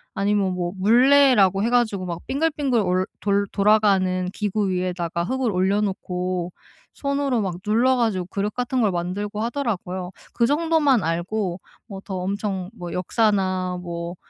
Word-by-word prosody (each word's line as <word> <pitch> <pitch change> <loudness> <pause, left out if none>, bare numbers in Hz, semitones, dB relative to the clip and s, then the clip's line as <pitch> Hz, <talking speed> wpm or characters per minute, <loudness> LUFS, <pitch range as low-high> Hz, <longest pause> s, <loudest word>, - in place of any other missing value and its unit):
아니면 200 -2 +1
뭐 175 -1 -3
물레라고 235 -2 +5
해 230 - +1
가지고 220 -6 +1
막 170 -1 -4
빙글빙글 280 -3 0
올 185 0 +1 0.2
돌 200 0 +1
돌아가는 195 -3 +2
기구 210 -1 -1
위에다가 180 -2 -2
흙을 255 +4 -1
올려놓고 185 -2 -1 0.4
손으로 280 -4 -1
막 185 -4 -2
눌러 240 +5 +3
가지고 215 -7 0
그릇 200 +2 -3
같은 250 0 -1
걸 210 - +2
만들고 195 +4 -3
하더라고요. 195 -8 -3 0.2
그 235 - +2
정도만 295 - +2
알고 175 +3 -2 0.3
뭐 195 -3 -8
더 195 -1 -6
엄청 190 0 -3
뭐 175 -1 -6
역사나 185 -2 0
뭐 170 0 -5
200 Hz, 300 characters per minute, -23 LUFS, 180-230 Hz, 0.4 s, 물레라고